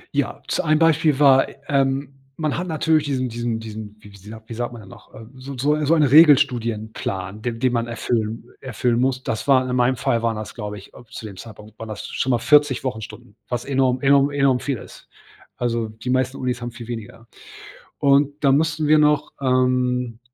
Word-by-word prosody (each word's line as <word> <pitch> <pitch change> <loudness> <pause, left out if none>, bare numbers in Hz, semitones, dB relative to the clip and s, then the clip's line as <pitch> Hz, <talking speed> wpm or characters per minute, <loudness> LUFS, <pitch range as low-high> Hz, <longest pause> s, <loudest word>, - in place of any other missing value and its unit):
Ja, - - -2
z - - -1
ein 155 0 +2
Beispiel 160 -2 +3
war, 135 -2 +5 0.2
ähm, 135 0 0 0.2
man 155 -3 -1
hat 180 +2 -3
natürlich 160 -1 +1
diesen 130 -3 -1
diesen 120 -1 -3
diesen, 110 -1 -8
wie 105 -1 -15
wie - - -14
sa 110 +3 -12
wie 115 - -9
sagt 120 +1 -3
man 120 - -10
denn 95 - -15
noch, - - -16
ähm, 110 +1 -12
so 135 +2 -8
'n - - -9
so 145 +4 +2
eine 150 -1 -1
so 165 - +4
einen 150 -3 +4
Regelstudienplan, 115 - +2
den 115 -1 -4
den 125 -1 +1
man 115 0 -1
erfüllen 115 -1 -2 0.2
erfüllen 120 -1 -1
muss. 130 0 0
Das 115 - -4
war 130 -2 +4
in 125 - -2
meinem 125 +1 +2
Fall 115 -1 0
waren 115 -1 0
das, 110 0 -7
glaube 105 -3 -6
ich, 100 - -14
äh, - - -14
zu - - -9
dem 100 -3 -8
Zeitpunkt 110 -1 -13
waren 115 - -7
das 110 - -6
schon 130 - -3
mal 120 - +3
40 145 +1 +3
Wochenstunden, 110 -3 -7
was 120 -1 -3
enorm 130 -2 +1
enorm 140 0 +4
enorm 140 -3 +2
viel 140 -3 -3
ist. - - -14 0.5
Also, 115 -2 -1
die 110 +3 -6
meisten 130 +1 0
Unis 125 -1 -3
haben 120 0 -5
viel 120 -1 -10
weniger. 115 0 -8 0.7
Und 145 +1 +2
dann 135 -1 +5
mussten 155 0 0
wir 155 +1 +5
noch, 150 -1 +2
ähm, 125 -2 +1
125 Hz, 210 wpm, -21 LUFS, 115-140 Hz, 0.7 s, war